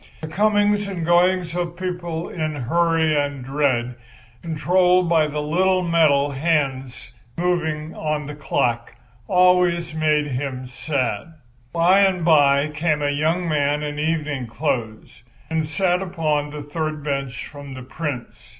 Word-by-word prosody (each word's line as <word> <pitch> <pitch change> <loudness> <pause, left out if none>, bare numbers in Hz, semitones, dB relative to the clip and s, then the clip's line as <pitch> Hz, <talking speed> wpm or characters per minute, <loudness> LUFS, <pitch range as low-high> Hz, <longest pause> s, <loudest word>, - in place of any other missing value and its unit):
The 160 - -5
comings 205 +3 +2
and 180 -4 -4
goings 175 0 +2
of 175 -1 -3
people 175 -2 -4
in 155 -3 -3
hurry 160 +3 +1
and 145 -3 -2
dread, 130 -3 0 0.5
controlled 180 +2 +2
by 160 -2 +3
the 150 0 -3
little 185 +4 +2
metal 155 -5 +3
moving 135 -1 -7
hands 135 -6 -1 0.3
of 155 -3 -2
a 150 - -6
clock, 120 -5 -1 0.3
always 180 -2 +3
made 155 -1 +1
him 130 -1 -4
sad. 130 +1 -3 0.4
By 175 +5 +4
and 190 -4 +2
by 145 -2 +4
came 155 -1 -1
a 145 - +1
young 160 +5 0
man 150 -1 +1
in 150 0 -4
evening 150 -5 -1
clothes 115 -5 -4 0.3
and 160 -1 0
sat 180 +3 +1
upon 155 -5 -1
the 150 0 -7
third 155 0 -4
bench 140 -4 -3
from 140 -2 -10
the 130 - -8
Prince. 140 -2 -6
155 Hz, 140 wpm, -22 LUFS, 145-170 Hz, 0.5 s, By